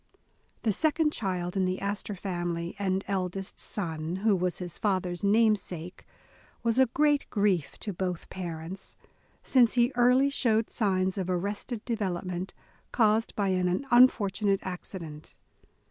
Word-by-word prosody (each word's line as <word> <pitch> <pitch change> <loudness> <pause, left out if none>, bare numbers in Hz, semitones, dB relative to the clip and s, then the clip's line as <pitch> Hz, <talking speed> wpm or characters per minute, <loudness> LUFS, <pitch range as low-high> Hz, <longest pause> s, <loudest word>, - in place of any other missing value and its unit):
The 220 - +2
second 310 - +2
child 180 -3 -2
in 190 -1 +2
the 185 +1 -1
Astor 200 +1 -3
family, 175 -2 -3
and 190 -1 0
eldest 190 0 -3
son, 165 -3 -4
who 215 -3 +5
was 180 -1 -1
his 175 -3 -6
father's 185 -3 -1
namesake, 200 -5 +1 0.6
was 230 +2 +2
a 260 - +6
great 290 +3 +2
grief 200 -7 0
to 205 - -3
both 180 -1 -3
parents, 175 +1 -6 0.5
since 245 -4 +4
he 240 +1 +3
early 250 +3 +4
showed 225 -5 +1
signs 190 -3 0
of 185 -1 -3
arrested 205 +5 -3
development, 185 -5 -3 0.4
caused 220 -1 +2
by 200 -2 0
an 185 +6 0
unfortunate 205 -5 +4
accident. 170 -4 -7
195 Hz, 130 wpm, -28 LUFS, 180-220 Hz, 0.6 s, a